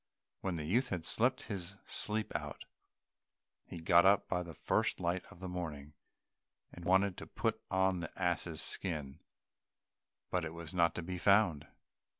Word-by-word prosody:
When 95 -2 -2
the 80 -2 -4
youth 120 - +2
had 85 -4 -3
slept 120 +9 +1
his 100 -2 -5
sleep 105 0 -2
out, - - -4 1.0
he 85 - -7
got 85 +1 +6
up 100 +1 +5
by 90 -1 0
the 85 -2 -8
first - - +1
light 90 +2 0
of 95 +2 -9
morning, 75 -5 -5 0.8
and 85 - -10
wanted 95 +1 +3
to - - -7
put - - -1
on 95 -1 +2
the 85 -1 -5
ass's 85 -3 0
skin, 75 -5 +1 1.1
but 90 -2 +1
it 80 0 -5
was 85 -2 -8
not 85 -2 +3
to 90 - -3
be 90 +1 -4
found. 100 -6 +4
90 Hz, 155 wpm, -34 LUFS, 85-95 Hz, 1.1 s, got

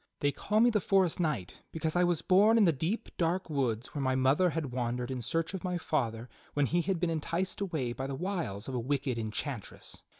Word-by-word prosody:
They 145 - +3
call 210 +8 +1
me 240 +1 +6
the 210 -2 +1
forest 190 -3 +2
knight 150 - -2
because 160 0 -2
I 180 - +4
was 175 -3 +1
born 210 +5 +5
in 225 - +6
the 165 - +4
deep, 165 - -2
dark 175 +1 0
woods 125 -5 -1
where 145 - -2
my 130 -1 +1
mother 135 +8 +4
had 155 -5 -3
wandered 125 0 -2
in 130 -1 -3
search 165 - -1
of 190 - -5
my 180 -1 -1
father 120 -8 -1 0.3
when 145 -1 +3
he 175 +6 +1
had 185 0 -1
been 175 -1 +1
enticed 165 +5 -2
away 155 -11 -1
by 130 +2 -4
the 135 - -3
wiles 165 - -3
of 135 - -4
a 125 - 0
wicked 135 0 -1
enchantress. 110 +1 -5
155 Hz, 225 wpm, -31 LUFS, 130-180 Hz, 0.3 s, me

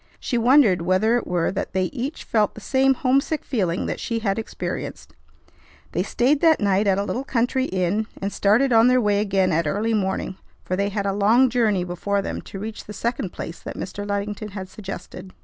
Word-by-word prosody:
She 250 - -3
wondered 235 - +5
whether 185 +7 +2
it 245 - -1
were 175 -2 0
that 190 - -4
they 190 0 +1
each 265 +9 -4
felt 215 -2 +1
the - - -8
same 265 +4 +2
homesick 275 +4 +1
feeling 185 -9 -1
that - - -3
she 230 - -2
had 210 -2 -1
experienced. 220 - -6 0.8
They - - 0
stayed 275 +4 +1
that 325 -2 +5
night 200 0 +2
at 195 -1 +3
a 200 - 0
little 245 +5 -3
country 260 0 0
inn, 190 +3 -1
and 195 +1 -3
started 235 +6 +3
on 225 +1 +6
their 255 0 +4
way 205 -3 +2
again 195 -3 +1
at 165 0 +1
early 215 +7 0
morning, 190 -2 -1 0.3
for 185 - -2
they 200 +2 0
had 200 0 -2
a 195 - 0
long 225 +6 +4
journey 215 -6 +2
before 195 +3 -2
them - - -4
to - - -9
reach 215 +2 -6
the 210 - -8
second 230 -5 -2
place 170 - -7
that - - -8
Mr. 200 +2 -5
Luddington 205 +1 -3
had 190 -2 -7
suggested. 190 -2 -8
205 Hz, 205 wpm, -23 LUFS, 190-240 Hz, 0.8 s, on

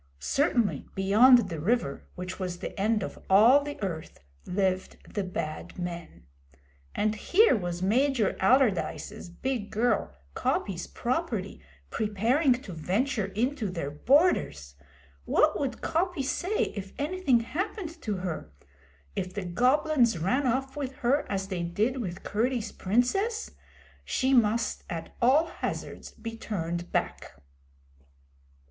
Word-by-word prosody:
Certainly, 245 - +1
beyond 225 +5 +6
the 165 -4 -5
river, 175 - -1
which 180 +1 -6
was 180 -2 -3
the - - -6
end 210 +1 +2
of - - -6
all 230 +9 +7
the 290 0 -6
Earth, 165 -5 -5 0.3
lived 185 0 -1 0.2
the 205 - -1
Bad 155 -4 -5
Men. 170 - -6 0.7
And 215 +1 +1
here 370 - +4
was 175 -3 -3
Major 245 +1 +2
Allardyce's 210 -3 +1
big 235 +3 -3
girl, 230 +3 +1 0.2
Coppy's - - -1
property, - - -3 0.3
preparing 230 - +2
to 190 - -8
venture 200 - 0
into 225 +3 -1
their 165 -6 -4
borders! 150 - +2 0.5
What 310 0 +3
would 265 -4 -3
Coppy 350 -3 0
say 365 +9 -1
if 195 -1 -6
anything 290 -5 +2
happened 345 - -4
to 210 - -2
her? 175 - -5 0.6
If 185 0 -4
the 200 -2 -3
Goblins 250 - +3
ran 250 - +1
off 265 +2 -1
with 275 -3 -4
her 280 +4 +2
as 195 -1 -2
they 185 -3 -2
did 210 +10 0
with 180 -8 -5
Curdie's 235 +1 -1
Princess? 390 - 0 0.5
She 260 +1 +1
must 230 -2 +2
at 165 -1 -6
all 270 +7 +5
hazards - - -5
be 230 -1 -8
turned 175 -6 -4
back. - - -2
220 Hz, 130 wpm, -28 LUFS, 185-270 Hz, 0.7 s, all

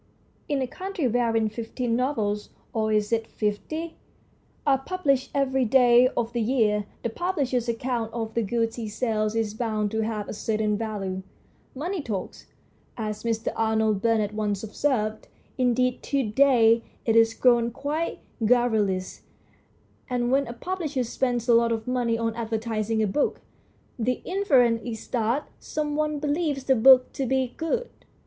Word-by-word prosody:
In 280 -3 +1
a - - -2
country 370 -2 -3
wherein 230 -2 +1
fifteen 230 +2 -3
novels 220 -5 -1 0.2
or 220 -1 0
is 210 0 +1
it 225 -1 0
fifty? 310 +11 -3 0.7
are 275 -2 +4
published 275 -4 0
every 265 -1 +2
day 245 0 +6
of 235 0 -1
the 240 - 0
year, 215 -4 +1 0.2
the 235 - 0
publisher's 265 -7 -1
account 235 -1 -2
of 225 -1 -4
the 235 - +1
goods 230 +2 -1
he 225 -3 -4
sells 215 -1 -1
is 220 -2 0
bound 215 -2 -1
to 220 - 0
have 215 -2 -3
a - - -5
certain 215 0 0
value. 200 -4 -3 0.5
Money 345 +6 -3
talks, 210 -8 -5 0.5
as 215 -2 -4
Mr. 225 -1 -1
Arnold 220 -2 +1
Bennett 220 -2 +1
once 210 -2 -2
observed 215 -1 -1 0.3
indeed 250 0 +2
to 275 -1 0
day 230 -1 +4 0.2
it 225 - +2
is 225 0 +5
grown 240 -2 +4
quite 290 +7 -3 0.2
garrulous 215 -6 +1 0.9
and 245 -1 0
when 275 0 +2
a 235 - -5
publisher 305 -1 -3
spends 245 0 -1
a 240 - +5
lot 230 0 +4
of 225 0 -2
money 245 -2 0
on 230 0 -1
advertising 225 -1 -1
a - - +3
book, 240 +10 0 0.6
the 245 +2 -1
inference 260 -12 +3
is 225 -3 -6
that 240 +4 0
some 300 -1 -3
one 305 0 0
believes 290 -1 -1
the 265 - +3
book 255 +2 +6
to 270 - -2
be 260 -1 0
good. 470 +10 -1
235 Hz, 155 wpm, -25 LUFS, 220-265 Hz, 0.9 s, day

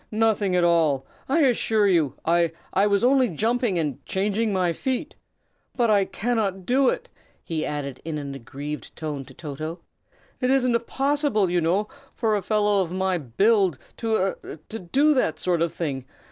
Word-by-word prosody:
nothing 215 -3 +1
at 180 - +3
all, 160 -6 +3 0.2
I 320 +5 +3
assure 225 -5 +3
you. 165 -8 +2
I 170 0 +2 0.2
I 195 +2 +3
was 200 +1 +2
only 260 0 +4
jumping 225 - 0
and 150 -6 -2
changing 205 +3 0
my 180 -3 +1
feet. 265 - -3 0.6
But 235 -3 +2
I 200 -2 +4
cannot 195 -2 -2
do 260 +3 +3
it!" - - -3 0.4
he 160 -2 -3
added, 140 -3 -4
in 160 -1 -4
an 140 -2 -5
aggrieved 140 +3 -7
tone, 150 -4 -5
to - - -15
Toto. 155 +2 -6 0.6
"It 250 - +1
isn't 245 -3 +2
possible, 275 - +1
you 175 -1 +2
know, 185 +6 +1 0.3
for 220 -3 +1
a 205 - 0
fellow 205 0 +2
of 175 -3 -3
my 185 -1 0
build 190 - +2 0.2
to 220 -5 0
a - - -7 0.2
do 275 - +3
that 160 - +1
sort 175 -1 0
of 170 -1 +1
thing. 135 -6 -4
190 Hz, 170 wpm, -24 LUFS, 160-225 Hz, 0.6 s, only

